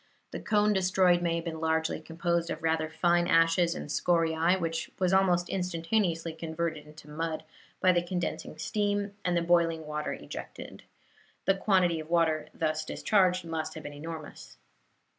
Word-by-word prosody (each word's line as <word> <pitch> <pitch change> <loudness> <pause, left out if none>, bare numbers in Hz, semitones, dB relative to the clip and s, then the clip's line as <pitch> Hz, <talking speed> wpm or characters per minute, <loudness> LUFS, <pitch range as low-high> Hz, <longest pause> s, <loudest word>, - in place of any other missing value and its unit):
The - - -5
cone 210 -1 +2
destroyed 185 -2 +3
may 170 -1 0
have 170 0 -3
been 160 -1 -4
largely 160 0 0
composed 170 +1 -1
of 160 - -5
rather 160 -1 +1
fine 175 +2 +2
ashes 165 +1 +3
and - - -6
scoriae, 165 +3 +2
which 165 -1 -2
was 185 -1 +1
almost 180 -2 +3
instantaneously 170 -2 -1
converted 160 -1 -4
into 150 0 -14
mud 160 +1 -3 0.4
by 185 - +5
the 175 -1 +2
condensing 175 0 -4
steam 205 -1 -1
and 175 -1 +1
the 170 - +1
boiling 165 -2 +2
water 150 0 -3
ejected. - - -9 0.6
The 195 - +5
quantity 185 -4 +2
of 155 0 -8
water 165 -2 +2
thus 155 -1 -1
discharged 185 -1 +1
must 160 -1 -4
have 155 - -8
been 145 - -7
enormous. 155 +1 -9
170 Hz, 160 wpm, -29 LUFS, 160-180 Hz, 0.6 s, by